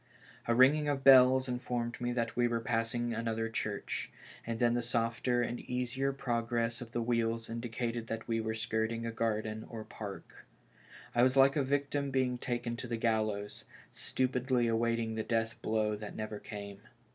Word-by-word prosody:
A 115 - +3
ringing 145 +4 +5
of 140 -2 -1
bells 130 -1 +7
informed 125 -1 -3
me 120 0 0
that 115 -2 -1
we 120 0 +3
were 120 -1 0
passing 115 +1 -1
another 115 0 -1
church, 110 -2 -3 0.4
and 115 -1 -2
then 120 0 +3
the 120 - +1
softer 120 +1 0
and 120 0 -3
easier 125 +2 -1
progress 115 -3 -1
of 115 -2 -8
the 120 0 -1
wheels 115 -1 0
indi 115 +1 -4
cated 115 0 -3
that 115 0 -5
we 115 -1 0
were 110 0 -2
skirting 110 +1 -1
a 115 - -2
garden 110 -1 -1
or 110 -2 -6
park. 100 -2 -9 0.7
I 120 - +3
was 130 +2 +4
like 135 +1 +6
a 145 - +3
victim 140 +1 0
being 130 -2 0
taken 120 -1 -2
to 125 - -5
the 115 -1 -2
gallows, 110 -3 -1 0.3
stupidly 125 -1 0
await 115 0 +1
ing 115 -1 -2
the 110 0 -2
death 115 0 -1
blow 110 -1 +1
that 105 0 -7
never 110 -1 -4
came. 100 -2 -8
115 Hz, 180 wpm, -32 LUFS, 115-125 Hz, 0.7 s, bells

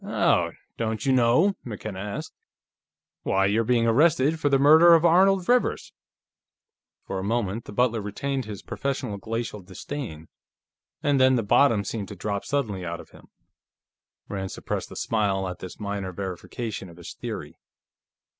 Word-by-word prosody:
"Oh! - - +1 0.2
Don't 110 -1 -2
you 135 - +3
know?" 130 +11 +4
McKenna 105 -4 -6
asked. 100 +1 -5 0.9
"Why, 95 0 +1
you're 105 +4 +2
being 115 0 +2
arrested 145 +5 +3
for 145 - +1
the 140 - +4
murder 160 +5 +7
of 165 +1 +3
Arnold 185 +2 +4
Rivers." 245 0 +1 1.1
For 95 - -4
a - - -4
moment 110 0 -1
the - - -9
butler 115 0 +1
retained 130 +6 -3
his 105 -2 -8
professional 130 -6 -3
glacial 110 0 -4
disdain, 95 - -7 0.8
and 145 -3 +2
then 130 0 +5
the 115 - +1
bottom 110 0 +4
seemed 100 0 -4
to 100 - -8
drop 100 +1 -3
suddenly 110 -10 -2
out 85 -1 -4
of - - -13
him. - - -17 1.0
Rand 95 -2 -4
suppressed - - -4
a - - -9
smile 100 -4 0
at 90 -1 -6
this 95 +2 -9
minor 100 -2 -4
verification 95 +3 -5
of 85 - -15
his 85 - -9
theory. - - -7
110 Hz, 155 wpm, -25 LUFS, 100-135 Hz, 1.1 s, murder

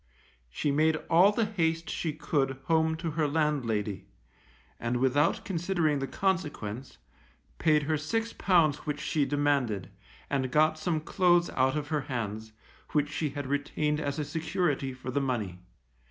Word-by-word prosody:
She 145 - -1
made 155 +2 +3 0.2
all 180 +5 +7
the 225 +1 +1
haste 165 -6 -1
she 165 - -2
could 140 -3 -1
home 160 -1 +2
to 165 -1 -3
her 155 0 +1
landlady, 120 - -1 0.7
and 120 +1 -1
without 135 +5 +2
considering 170 -5 0
the 135 - -2
consequence, 145 - -2 0.6
paid 155 -2 +3
her 155 +1 0
six 225 +9 -2
pounds 165 -6 +3
which 145 -1 -2
she 145 -1 0
demanded, 135 -10 0 0.4
and 135 -2 -1
got 155 +3 +3
some 155 -1 -1
clothes 175 0 +3
out 130 +3 +2
of 145 -1 -4
her 150 -2 0
hands, 110 -5 -4 0.4
which 145 -1 +2
she 155 -1 -1
had 140 0 -5
retained 145 +2 -1
as 145 -2 -2
a 150 - -2
security 160 -4 -1
for 130 0 -7
the 140 +2 0
money. 110 -9 -2
150 Hz, 155 wpm, -29 LUFS, 135-160 Hz, 0.7 s, all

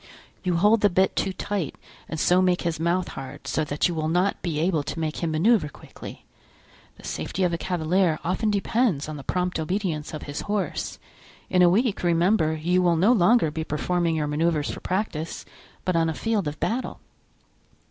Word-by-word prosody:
You 180 -2 0
hold 210 +5 +4
the 205 - +5
bit 190 +1 +2
too 195 - 0
tight 190 -4 -3 0.3
and 160 - -4
so 180 +3 +4
make 180 -1 +2
his 170 -2 -1
mouth 170 +2 0
hard, 135 -1 -8
so 160 - 0
that 145 0 +1
you 175 - -3
will 155 -1 -1
not 180 +4 +1
be 165 -4 -2
able 165 -1 +1
to 145 - -5
make 155 -1 -2
him 170 - -1
manoeuvre 165 +2 +3
quickly. - - -11 0.7
The - - -16
safety 190 - -3
of 175 -1 +1
a - - 0
cavalier 175 -1 +1
often 185 +5 0
depends 205 - +1
on 155 - -5
the 140 - -8
prompt 180 +1 -1
obedience 165 -2 -2
of 155 - -6
his 145 0 -5
horse. 205 -1 -2 0.5
In 185 - +4
a 175 - +7
week, 215 +3 +1
remember, 170 -1 +2
you 175 +4 +1
will 175 -2 +3
no 195 +8 +4
longer 205 -4 +4
be 160 +1 -3
performing 170 +2 0
your 155 -1 0
manoeuvres 150 0 0
for - - -7
practice, 180 -4 -3 0.4
but 185 - +1
on 165 -1 +2
a 160 - -3
field 215 -4 -1
of 150 +1 -5
battle." 250 +3 -2
175 Hz, 195 wpm, -25 LUFS, 160-190 Hz, 0.7 s, a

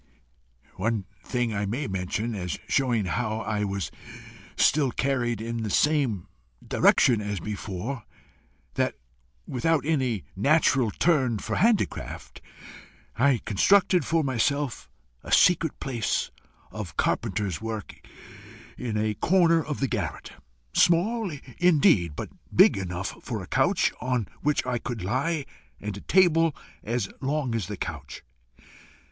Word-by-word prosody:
One 105 0 -1 0.2
thing 120 -3 -1
I 100 0 -1
may 125 +9 -2
mention, 100 +3 -2
as 90 -6 -3
showing 120 -6 +1
how 110 +3 -2
I 105 -2 -1
was 100 -4 -3 0.7
still 145 -3 +3
carried 120 -3 -1
in 115 +1 -4
the 110 - -3
same 135 - +1 0.4
direction 115 -4 +4
as 105 -2 -3
before 105 +5 -5 0.7
that, - - 0 0.5
without 145 +4 0
any 130 - 0
natural 135 - +3
turn 130 -4 +2
for 110 +1 -3
handicraft, 225 0 0 0.7
I 130 -2 +3
constructed 180 - +4
for 160 +3 +1
myself 135 +1 -1 0.3
a - - -9
secret 165 -3 +4
place 120 -5 -1 0.4
of - - -7
carpenter's 105 -4 -1
work 110 -2 -5 0.9
in 115 -4 -2
a 110 0 0
corner 165 - +3
of 150 - -4
the 135 - +2
garret, 100 - -4 0.4
small 195 - +3 0.3
indeed, 140 - +4
but - - -5 0.2
big - - +6
enough 90 -1 -5
for - - -4
a - - -10
couch - - +2
on 125 -5 -1
which 150 -2 +1
I 125 -1 -1
could 115 -4 -5
lie, 140 - -1 0.3
and 105 -1 -5
a 100 - -8
table 165 -4 +3 0.3
as 115 -2 -1
long 140 -2 -1
as 110 -6 -2
the 105 -1 -5
couch. 70 -6 -6
120 Hz, 130 wpm, -26 LUFS, 105-145 Hz, 0.9 s, big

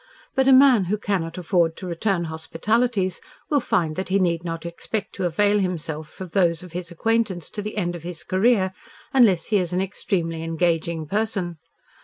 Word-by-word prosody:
But 265 0 +2
a - - +7
man 260 -6 +7
who 205 +4 0
cannot 185 -6 -2
afford 170 -2 +1
to 190 - -7
return 180 +1 0
hospitalities 185 +6 -1 0.3
will 290 - +4
find 180 - 0
that 190 - -3
he 195 - +3
need 170 -3 +1
not 165 -1 -5
expect 170 +5 -4
to 190 - -2
avail 205 +5 +2
himself 160 -5 -4
of 185 -3 -7
those 170 -2 +2
of 180 - -11
his 175 0 -5
acquaintances 200 -1 -1
to 210 - -4
the 215 +1 -6
end 175 -3 -1
of 170 - -7
his 170 -1 -6
career 190 +1 +2 0.4
unless 215 -10 +4
he - - +6
is 180 -2 -1
an 180 - +1
extremely 175 -4 -2
engaging 165 0 0
person. 195 -3 -2
180 Hz, 185 wpm, -23 LUFS, 165-205 Hz, 0.4 s, a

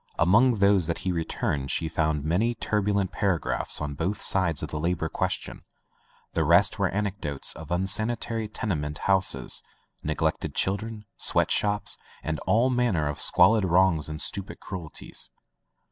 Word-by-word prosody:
Among 115 +9 +4
those 100 -4 +3
that 85 - -2
he 95 - +1
returned 75 -5 -2
she 80 - 0
found 80 -2 -1
many 105 +9 +1
turbulent 100 -3 0
paragraphs 95 -5 -1
on 75 -1 -3
both 90 +8 -2
sides 90 -6 +2
of - - -4
the 75 - -4
labor 80 0 -1
question: - - -3 0.7
the - - +1
rest - - +4
were - - +2
anec 105 0 -2
dotes 70 -2 -3
of 80 -2 -10
unsanitary 110 +5 +1
tenement 75 -9 -3
houses, 95 -1 +1 0.4
neg - - -2
lected - - -1
children, 105 +2 -2
sweat - - +3
shops, 105 0 0 0.2
and 80 -1 -2
all 120 +4 +3
man 125 -5 +1
ner 75 -2 0
of 75 - -4
squalid 100 +4 +5
wrongs 85 -4 +3
and 75 0 -5
stupid 100 -1 -5
cruelties. 85 -5 -6
95 Hz, 155 wpm, -26 LUFS, 80-105 Hz, 0.7 s, squalid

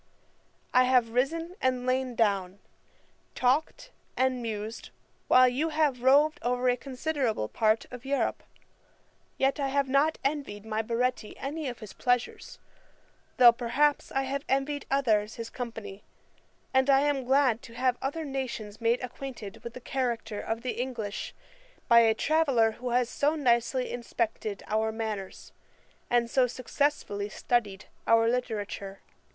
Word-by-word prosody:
I 255 0 +6
have 250 -3 +3
risen 325 +8 -1
and 255 -1 0
lain 255 -1 0
down, 200 -4 +1 0.8
talked 285 - 0 0.3
and 260 -1 +1
mused, 220 -1 -5 0.4
while 255 0 +7
you 275 +6 0
have 300 -5 +1
roved 285 +4 +4
over 250 +1 0
a 245 - +3
considerable 260 - -2
part 220 - +1
of 250 -1 -9
Europe; 275 +1 -1 1.0
yet 270 +2 +1
I 275 - 0
have 280 0 +1
not 280 +4 +2
envied 275 -8 -3
my 220 0 -1
Baretti 235 0 -2
any 290 +1 -4
of 245 - -7
his 215 - -9
pleasures, 245 -1 -1 0.8
though, 245 -2 +9
perhaps, 260 +5 +1
I 270 - 0
have 275 +1 -3
envied 275 +2 -1
others 220 -6 +1
his 230 -1 -7
company: 225 -5 -7 0.7
and 265 +1 +3
I 270 0 +6
am 285 -2 +1
glad 260 -3 +3
to 230 - -13
have 250 0 +1
other 310 +4 -3
nations 245 -6 -5
made 230 +2 +1
acquainted 245 -4 -8
with 235 0 -8
the - - -6
character 235 -4 -2
of 225 +1 -4
the 250 -1 -2
English, 225 -6 -5 0.5
by 235 - +7
a 225 -1 +4
traveller 275 -7 +2
who 245 +3 -6
has 245 0 +2
so 290 +5 0
nicely 250 -2 +1
inspected 230 -3 -3
our 220 +1 0
manners, 215 -4 -5 0.6
and 240 -1 +2
so 250 +1 +3
successfully 250 -5 -1
studied 210 -4 -1 0.2
our 230 0 +5
literature. 210 -5 -3
250 Hz, 145 wpm, -28 LUFS, 225-270 Hz, 1.0 s, though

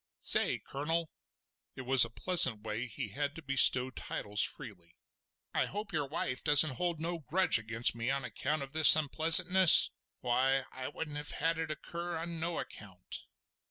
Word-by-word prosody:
Say - - +3
Colonel!" 160 +4 -6 0.6
it - - -10
was 130 0 +4
a 115 - -2
pleasant 130 - +3
way 110 +3 -6
he 120 -2 -8
had 145 +6 -6
to 165 - -13
bestow 130 -2 +4
titles 105 -4 -6
freely—"I 85 -5 -8
hope 205 0 -9
your 150 -4 -4
wife 130 -3 -5
don't 150 0 +5
hold 160 +3 -6
no 170 +1 -6
grudge 165 0 0
against 115 +1 -3
me 115 +2 -6
on 135 -1 -4
account 150 +3 -5
of 135 - -13
this 155 -1 +9
unpleasantness? 165 +4 +4 0.3
Why, 130 +2 -2
I 130 0 -9
wouldn't 150 0 -9
have 150 0 -6
had 165 +1 -3
it 160 -1 -6
occur 170 +3 -8
on 165 0 -8
no 170 +1 -6
account." 95 -4 -11
145 Hz, 160 wpm, -29 LUFS, 125-165 Hz, 0.6 s, this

